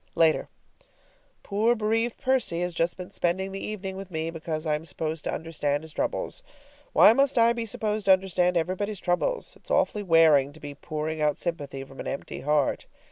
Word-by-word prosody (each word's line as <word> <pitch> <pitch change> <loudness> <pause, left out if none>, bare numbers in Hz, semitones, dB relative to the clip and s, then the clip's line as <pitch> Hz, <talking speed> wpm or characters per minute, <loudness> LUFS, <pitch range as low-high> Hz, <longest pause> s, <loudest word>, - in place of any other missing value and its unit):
LATER. 160 -2 +3 0.9
Poor 220 +4 +2
bereaved 225 +2 0
Percy 255 -10 +1
has 180 0 -2
just 165 +1 0
been 180 +1 -8
spending 190 +1 -1
the 195 - -5
evening 195 -3 -5
with 195 -1 -8
me, 160 -1 -3
because 160 -1 -4
I 155 - +1
am 150 +1 -2
supposed 160 0 -4
to - - -1
understand 150 -2 -2
his 160 -1 -10
troubles. - - -3 0.5
Why 215 - +8
must 275 +1 +2
I 230 0 +5
be 235 -1 -4
supposed 215 0 -2
to 195 - +8
understand 180 -1 +1
everybody's 190 +4 -2
troubles? 180 - -1
It's - - -19
awfully 210 - +1
wearing 160 -6 +5
to 160 - -15
be 145 -1 -7
pouring 155 +2 -4
out 150 -1 +2
sympathy 145 -6 -4
from 135 0 -14
an - - -5
empty 135 - -5
heart. 150 -2 0
175 Hz, 190 wpm, -26 LUFS, 155-205 Hz, 0.9 s, Why